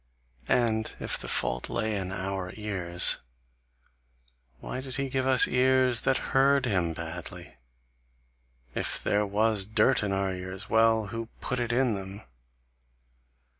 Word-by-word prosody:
And 110 -2 +1
if - - -1
the - - -4
fault - - -1
lay 110 -1 -1
in 95 -2 -3
our 95 -1 -4
ears, 95 -5 +4 1.4
why 130 - -6
did 130 -1 -6
he 140 -1 -2
give 130 0 -1
us 130 -1 +6
ears 130 -2 +2
that 135 - -1
heard 135 0 +4
him 90 -8 0
badly? 85 +1 -8 1.2
If - - -2
there 105 0 +1
was 105 0 +1
dirt 110 +5 +2
in 100 -2 -2
our 95 -1 -1
ears, 95 +2 -7
well! 110 -1 +3
who 115 0 -4
put 125 - -3
it 120 -1 -2
in 125 -1 +1
them? 100 +1 -7
110 Hz, 135 wpm, -27 LUFS, 95-125 Hz, 1.4 s, us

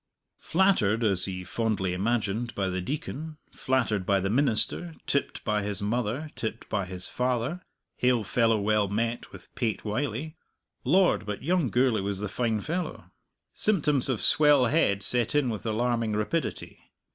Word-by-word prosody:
Flattered 160 - +2
(as 100 -4 +1
he 90 -1 -5
fondly 100 -2 -1
imagined) 110 +3 -1
by 95 -2 0
the 95 0 -2
Deacon, 155 - -5
flattered 120 -7 0
by 100 +1 +2
the 95 +1 -1
minister, 140 +6 +1
tipped 140 - -1
by 105 -1 0
his 100 -1 -2
mother, 120 +7 -2
tipped 110 0 -5
by 100 -3 -1
his 90 0 +1
father, 125 +7 -1 0.4
hail 125 -3 +2
fellow 115 +2 +2
well 105 0 +2
met 115 +4 -2
with - - -13
Pate 115 -3 -2
Wylie 135 +7 -3 0.5
Lord, 170 - +3
but 105 +2 -4
young 170 -3 +1
Gourlay 120 -2 +2
was 100 0 -2
the 105 0 -3
fine 115 -1 -1
fellow! 175 - -4 0.4
Symptoms 150 - +1
of 125 -5 -1
swell 145 -2 +5
head 110 -8 +2
set 120 +1 0
in 140 -5 +2
with 110 +1 -5
alarming 115 0 0
rapidity. 105 +11 -2
115 Hz, 155 wpm, -27 LUFS, 105-140 Hz, 0.5 s, swell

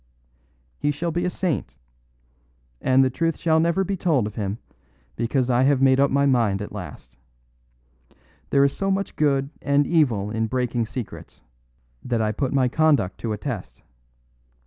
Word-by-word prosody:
He 145 - 0
shall 165 +4 -2
be 175 +2 -1
a - - +1
saint; 155 - -3 1.0
and 130 +1 +4
the 130 - +1
truth 165 +4 -1
shall 160 -1 +2
never 170 +4 +2
be 195 +1 -2
told 160 - +1
of 105 - -5
him, 105 -1 -3 0.6
because 125 +2 0
I 120 +1 +3
have 135 0 +3
made 135 0 +4
up 140 - +4
my 140 +1 +2
mind 115 -8 +2
at 105 - -6
last. - - -9 1.3
There 140 0 +4
is 140 - +1
so 195 - -1
much 195 +1 -1
good 140 -2 +1
and 140 0 +2
evil 120 - +1
in 110 0 -1
breaking 120 -1 -1
secrets, 115 -1 -8 0.6
that 120 -2 -1
I 110 -1 +1
put 130 +4 -2
my 135 -2 +2
conduct 145 - +1
to 115 - -3
a - - -3
test. 105 - -6
135 Hz, 170 wpm, -23 LUFS, 115-150 Hz, 1.3 s, and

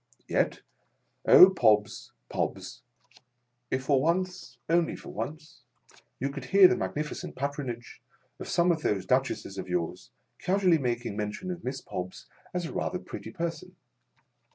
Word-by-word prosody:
Yet, - - 0 0.6
O, 190 - +10
Pobbs, 105 - +2 0.2
Pobbs! - - -3 0.9
if 130 0 -1
for 135 -1 +3
once 170 -4 -1
— - - -50
only 170 0 +2
for - - -10
once 155 0 -7 0.3
— - - -27
you 135 +2 -1
could 140 -2 -7
hear 195 +4 +8
the 185 - +2
magnificent 150 -4 -4
patronage 135 -4 -5 0.4
of - - -7
some 175 +1 +3
of 160 -2 -1
those 100 -9 0
Duchesses 125 -4 0
of 90 -1 -6
yours, 90 0 -3 0.3
casually 185 -3 +3
making 120 -5 -2
men 105 0 -2
tion 185 - -6
of 175 -1 -7
Miss 135 +1 -4
Pobbs, 90 0 -6 0.3
as 180 -1 -2
"a - - -6
rather 180 - -2
pretty - - -8
person 170 -1 -5
140 Hz, 155 wpm, -28 LUFS, 120-175 Hz, 0.9 s, O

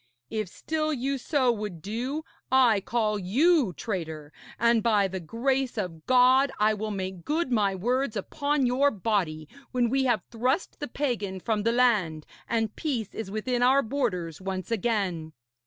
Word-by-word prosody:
If 215 -4 -2
still 310 +8 -2
you 275 0 -1
so 260 -2 +2
would 210 -6 -5
do, 245 - -3 0.3
I 245 -6 +5
call 215 -3 0
you 265 - +3
traitor, 160 -4 -5 0.2
and, 235 -1 +3
by 210 -3 +3
the 190 0 -5
grace 250 - -1
of 165 -6 -5
God, 255 +2 +5
I 215 +1 +4
will 215 +1 -3
make 190 -3 -4
good 310 -2 -1
my 205 -4 +2
words 245 +5 0
upon 285 +7 0
your 260 +4 +3
body, 185 - -1 0.2
when 245 -3 +1
we 270 0 +2
have 245 - +1
thrust 250 - -1
the 290 - -4
pagan 235 -8 -2
from 215 +2 -1
the 230 +2 +2
land 210 -11 +2 0.2
and 225 -2 0
peace 250 - -3
is 225 -4 -5
within 240 +4 -1
our 265 +3 +5
borders 195 - -2
once 190 +1 -4
again.' 190 -8 -1
225 Hz, 160 wpm, -27 LUFS, 190-260 Hz, 0.3 s, I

